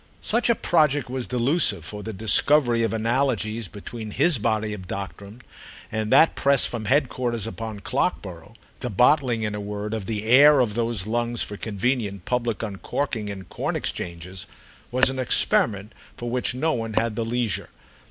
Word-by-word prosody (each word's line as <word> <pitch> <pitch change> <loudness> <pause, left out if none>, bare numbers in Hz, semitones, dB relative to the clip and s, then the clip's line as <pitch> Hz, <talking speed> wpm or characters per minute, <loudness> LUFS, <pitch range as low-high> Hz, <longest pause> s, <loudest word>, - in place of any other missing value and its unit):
Such 235 +2 +1
a 235 - +5
project 145 - +2
was 130 -2 -3
delusive, 130 +7 +1
for 105 -1 -5
the 110 - -5
discovery 120 +4 +3
of 115 - +1
analogies 115 -1 0
between 110 +3 -8
his 155 +5 +2
body 110 -1 0
of 95 -3 -8
doctrine 100 +5 -7 0.5
and 110 0 -2
that 150 +5 +6
pressed 140 -1 +3
from 115 -3 -5
headquarters 125 -5 0
upon 110 -2 -6
Clockborough—the 105 - -4
bottling, 125 +1 +3
in 105 -1 -2
a 105 - -4
word, 105 +1 -5
of 105 -4 -4
the 105 -2 -2
air 140 +5 +7
of 120 -5 +1
those 115 -4 -1
lungs 120 +1 0
for 105 - -6
convenient 105 -2 -2
public 120 -3 -1
uncorking 110 +2 -3
in 100 -2 -6
corn - - -4
exchanges—was 90 +8 -3
an 130 - -5
experiment 105 -4 +1 0.2
for 120 0 -5
which 125 0 0
no 155 +5 +1
one 115 -2 -3
had 115 -1 +1
the 115 - -1
leisure. 115 -3 -2
115 Hz, 160 wpm, -24 LUFS, 105-125 Hz, 0.5 s, air